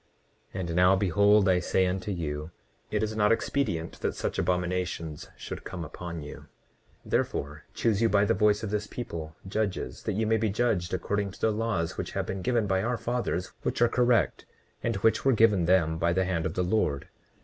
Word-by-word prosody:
29:24 - - -3
And 85 -2 -3
now 90 +2 +5
behold 100 +2 +4
I 90 -1 +4
say 95 +1 +1
unto 95 +3 -2
you, 75 -4 -3 0.4
it 105 0 0
is 110 0 -2
not 105 0 +3
expedient 115 -9 -1
that - - -2
such - - -2
abominations 90 -3 -2
should - - -7
come 85 -3 -6
upon 85 0 -7
you. 75 - -8
29:25 - - -15 0.6
Therefore, 75 +1 -2
choose 110 -2 +1
you 115 - +4
by 100 -1 +4
the - - +3
voice 105 +2 +2
of 105 - -3
this 105 0 -1
people, 80 -10 -6
judges, 105 0 -2
that - - -2
ye 110 +2 +1
may 110 +1 +3
be 110 0 0
judged 100 -5 0
according 100 +3 -1
to 95 - -13
the 110 - +3
laws 105 -7 -1
which - - -4
have - - -1
been 95 0 -4
given 120 +1 +1
you - - -2
by 95 0 +2
our 120 +3 -1
fathers, 115 -8 -2
which - - -2
are 120 - +5
correct, 120 -2 +2 0.3
and - - -1
which 110 +3 +2
were 135 - +4
given 105 -6 +4
them 80 -3 +3
by 85 0 +2
the 95 +1 +1
hand 90 -3 0
of - - -6
the 90 - +1
Lord. 90 -7 0
95 Hz, 210 wpm, -28 LUFS, 85-110 Hz, 0.6 s, now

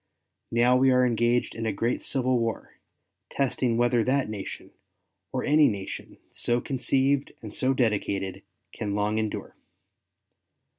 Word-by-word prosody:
Now 120 +2 +4
we 130 +1 +4
are 125 0 +4
engaged 120 0 +1
in 115 0 -3
a - - +1
great 115 +4 -1
civil 130 -2 0
war, 115 -1 -4 0.5
testing 125 -3 0
whether 120 -1 +3
that 130 -2 +1
nation, 100 -3 -7 0.6
or - - -2
any 150 0 +5
nation 100 -3 -5
so 120 0 0
conceived 135 +2 0
and 105 - -7
so 130 +1 +1
dedicated, 100 -5 -1 0.3
can 100 -2 -3
long 105 +1 0
endure. 110 -1 -4
120 Hz, 135 wpm, -26 LUFS, 110-130 Hz, 0.6 s, any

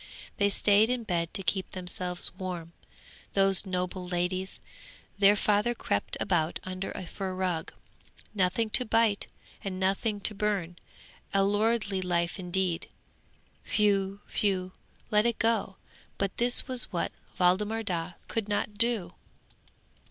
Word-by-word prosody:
They 200 0 +3
stayed 205 +2 +3
in 250 -1 -1
bed 170 -5 -2
to 195 - -3
keep 185 +2 -1
themselves 180 -1 +3
warm, 180 -3 -6 0.6
those 195 0 +2
noble 180 0 -3
ladies. 180 +1 -2 0.6
Their 200 +1 +6
father 210 +3 +1
crept 100 - -2
about 165 -3 0
under 185 +1 -5
a 185 - -6
fur 190 +1 -5
rug. 180 -3 -2 0.6
Nothing 205 +3 0
to 250 - +5
bite, 225 -3 +1 0.4
and 185 -2 -4
nothing 200 +3 0
to 210 - +6
burn! 195 -4 -2 0.6
a 195 - +4
lordly 205 -1 +1
life 175 0 -1
indeed! 180 -1 -2 0.9
Whew! 200 -1 +1
whew! 185 -3 0 0.4
let 210 +2 +4
it 235 - -1
go! 225 -4 0 0.4
But 195 -1 -2
this 245 +1 +6
was 255 -2 +5
what 175 - -2 0.3
Waldemar 205 +5 +2
Daa 175 -3 -3
could 220 -2 -3
not 205 0 -2
do. 225 -7 +1
195 Hz, 130 wpm, -28 LUFS, 180-210 Hz, 0.9 s, Their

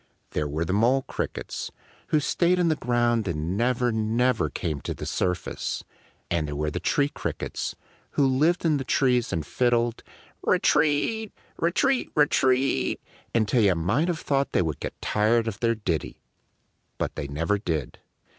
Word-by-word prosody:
There 75 - -1
were 80 +3 -2
the 95 - -1
Mole 120 +6 +3
Crickets, - - -4 0.4
who 155 - +3
stayed 175 +4 +2
in 175 -2 +3
the 155 - +2
ground 120 -4 +1
and 85 +1 -2
never, 120 +2 +1
never 110 -3 +1
came 75 +1 -3
to - - -4
the - - -6
surface; 90 -2 -2 0.5
and 80 -3 +1
there 75 - -4
were 75 +1 -1
the - - -3
Tree 145 0 +1
Crickets, - - -4 0.4
who 140 - +3
lived 150 +7 +2
in 155 -3 +3
the 135 - -3
trees 125 -2 +2
and 80 -2 -2
fiddled 120 -2 +1 0.4
re - - +3
teat! 160 +9 +2 0.3
re 170 - +2
teat 265 +7 +1
re 150 - +6
teat! 130 0 +2 0.4
until 115 +1 +3
you 100 -4 +4
might 100 - +1
have 170 -2 -1
thought 140 -1 0
they - - +3
would 80 -2 -3
get - - -6
tired 110 +2 +2
of 110 -2 -4
their 115 -1 +2
ditty. 90 -8 -3 0.7
But - - -2
they 70 - -4
never 85 +8 0
did. 80 - -3
120 Hz, 170 wpm, -26 LUFS, 90-140 Hz, 0.7 s, re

